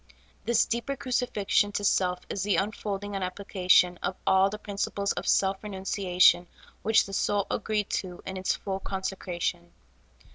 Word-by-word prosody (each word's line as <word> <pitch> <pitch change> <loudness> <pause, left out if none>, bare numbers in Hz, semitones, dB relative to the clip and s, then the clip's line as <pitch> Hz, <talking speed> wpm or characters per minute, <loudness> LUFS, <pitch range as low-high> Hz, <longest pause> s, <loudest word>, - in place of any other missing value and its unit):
This 235 -1 +3
deeper 235 +4 -2
crucifixion 240 -6 0
to 205 - -2
self 180 -2 +2
is 195 - -3
the 205 0 +1
unfolding 205 0 -2
and 195 -1 -2
application 180 -1 +2
of 185 - -2
all 190 +1 +4
the 210 - -5
prin 205 -1 -8
ciples 200 0 -1
of - - -4
self 195 +1 +2
renunciation 190 -3 +2 0.3
which 220 +1 +4
the 195 - -9
soul 200 +1 +1
agreed 210 -1 -1
to 180 -2 -3
in 190 - -5
its 185 0 0
full 195 -1 -4
consecration. 185 - -4
195 Hz, 155 wpm, -28 LUFS, 185-205 Hz, 0.3 s, all